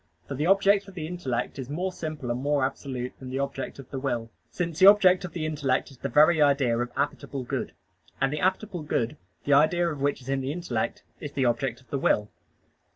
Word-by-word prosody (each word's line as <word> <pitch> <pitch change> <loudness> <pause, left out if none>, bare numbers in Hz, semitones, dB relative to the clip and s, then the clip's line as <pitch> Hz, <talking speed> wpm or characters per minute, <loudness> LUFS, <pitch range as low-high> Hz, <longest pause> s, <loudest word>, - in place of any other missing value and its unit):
For - - -4
the 150 +4 -1
object 200 +1 +4
of 195 - -12
the 160 -4 -4
intellect 145 -7 -3
is 130 -1 -6
more 180 +6 -2
simple 155 -8 -5
and 120 +2 -2
more 145 -1 +2
absolute 130 -2 -4
than 130 - -8
the 130 - -3
object 140 -1 -3
of 135 -3 -12
the 135 - -3
will; 120 -4 -2 0.2
since 170 +4 -3
the 190 - +8
object 190 -3 +7
of 170 - -8
the 160 -3 -3
intellect 145 -4 0
is 130 - -16
the - - -3
very 155 +2 +5
idea 140 -5 +3
of 120 +1 -2
appetible 140 -2 -3
good; - - -3 0.5
and 135 +1 +1
the 150 - -2
appetible 190 -1 0
good, 125 -3 -1 0.3
the 145 - +2
idea 170 +5 +4
of 150 -4 -4
which 140 0 +1
is 125 - -10
in 135 0 0
the 130 +1 -2
intellect, 145 -9 -3 0.2
is 145 -2 -7
the 135 -2 +1
object 120 +1 0
of 130 - -26
the 140 - -1
will. 105 -5 +1
140 Hz, 225 wpm, -27 LUFS, 130-170 Hz, 0.5 s, the